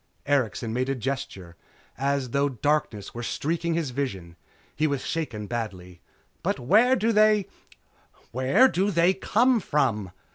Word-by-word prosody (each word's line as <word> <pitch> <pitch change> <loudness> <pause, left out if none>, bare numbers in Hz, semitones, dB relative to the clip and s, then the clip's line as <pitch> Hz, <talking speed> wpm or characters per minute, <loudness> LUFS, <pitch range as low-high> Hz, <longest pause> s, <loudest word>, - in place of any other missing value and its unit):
Erikson 125 -5 0
made 130 +2 -1
a 135 - 0
gesture 110 -9 -5 0.4
as 140 -2 -1
though 140 +1 +1
darkness 130 -5 -1
were 120 - -6
streaking 165 +6 -2
his 160 -6 -2
vision. 95 -11 -4 0.4
He 155 - +1
was 140 -3 -2
shaken 125 -11 -3
badly. 95 -6 -6 0.4
"But - - -1
where 220 - +4
do 230 -1 +1
they 215 -2 +4 0.9
where 130 - +4
do 195 -4 0
they 175 0 +3
come 235 +6 +2
from?" 125 - 0
140 Hz, 140 wpm, -25 LUFS, 115-170 Hz, 0.9 s, where